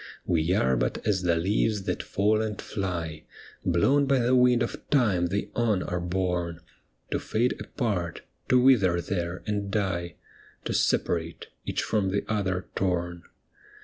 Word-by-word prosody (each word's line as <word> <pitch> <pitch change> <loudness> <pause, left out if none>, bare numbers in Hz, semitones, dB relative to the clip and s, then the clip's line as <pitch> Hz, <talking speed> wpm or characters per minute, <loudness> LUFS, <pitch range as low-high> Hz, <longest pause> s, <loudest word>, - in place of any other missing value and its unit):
' - - -33
We 80 +2 +1
are 65 -10 +2
but - - 0
as 100 -3 +2
the 85 -2 +2
leaves 100 +4 +1
that - - -2
fall 105 +2 +1
and 110 -2 -3
fly, 85 -6 -4 0.4
Blown 135 +12 +3
by 135 0 +3
the 125 0 +2
wind 125 -1 +5
of - - -6
time 105 -11 +3
they 100 +4 -2
on 110 -6 +1
are 90 - -2
borne, 90 -1 -2 0.5
To - - 0
fade 120 +3 0
apart, 95 - -3 0.3
to 125 - +6
wither 105 -10 +4
there 85 0 -3
and 100 -2 -2
die, 95 -4 -1 0.5
To - - -1
separate, 85 -1 0 0.2
each - - -1
from 100 -3 0
the 100 +2 0
other 95 -4 -1
torn.' 85 -2 -1
95 Hz, 155 wpm, -27 LUFS, 85-110 Hz, 0.5 s, to